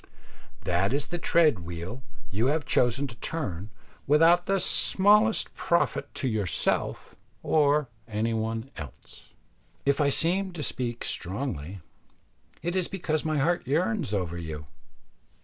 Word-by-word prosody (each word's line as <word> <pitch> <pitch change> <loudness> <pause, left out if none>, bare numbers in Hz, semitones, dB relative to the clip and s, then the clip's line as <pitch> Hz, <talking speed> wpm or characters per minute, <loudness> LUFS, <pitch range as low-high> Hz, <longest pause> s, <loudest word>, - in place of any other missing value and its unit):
That 90 +6 +1
is 145 - -1
the 175 - -3
tread 155 - +3
wheel 85 +8 -6 0.3
you 110 +6 +1
have 150 0 0
chosen 125 +1 +2
to 120 -4 -8
turn 105 - -4 0.4
without 165 +5 +5
the 195 0 +2
smallest 210 +5 +4
profit 170 -2 0
to 135 - -2
yourself 110 -6 -1 0.3
or 150 -2 +3 0.2
any 110 +1 -1
one 115 +3 -3
else. 75 -5 -11 0.6
If 140 +2 +2
I 145 - +4
seem 180 +6 +1
to 160 -4 -5
speak 120 -4 -3
strongly, 95 - -4 0.8
it 175 +2 -1
is 185 -2 +1
because 160 -5 -2
my 155 -1 0
heart 165 +1 +1
yearns 165 - 0
over 90 -4 -2
you. 80 -3 -6
135 Hz, 130 wpm, -27 LUFS, 105-165 Hz, 0.8 s, without